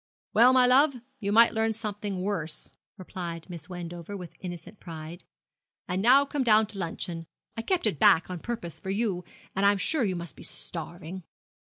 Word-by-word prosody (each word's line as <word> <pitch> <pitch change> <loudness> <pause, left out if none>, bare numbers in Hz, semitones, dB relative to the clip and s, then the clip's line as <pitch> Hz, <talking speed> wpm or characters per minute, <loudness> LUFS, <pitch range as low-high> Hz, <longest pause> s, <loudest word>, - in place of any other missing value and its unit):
'Well, 240 +3 +7
my 255 -1 +6
love, 275 +3 +5 0.2
you 200 -2 -2
might 230 +2 +6
learn 220 0 +1
something 205 -3 -4
worse,' 180 -6 -3 0.3
replied 175 -3 -6
Miss 165 -1 -7
Wendover, 175 +2 -6
with 180 -3 -9
innocent 175 +2 -8
pride. 165 +1 -8 0.6
'And 185 +1 -1
now 260 +6 +6
come 280 0 -2
down 220 -2 +5
to 210 -2 -4
luncheon; 165 -1 -4 0.3
I 225 - -3
kept 365 +5 0
it 195 -10 0
back 165 - +5
on 180 -2 -5
purpose 230 -5 -5
for 190 - -7
you, 195 -3 -1 0.3
and 195 - 0
I 200 - +7
am 205 - 0
sure 275 - +2
you 190 -4 0
must 170 -4 -6
be - - -13
starving.' 170 - -5
195 Hz, 185 wpm, -28 LUFS, 170-225 Hz, 0.6 s, Well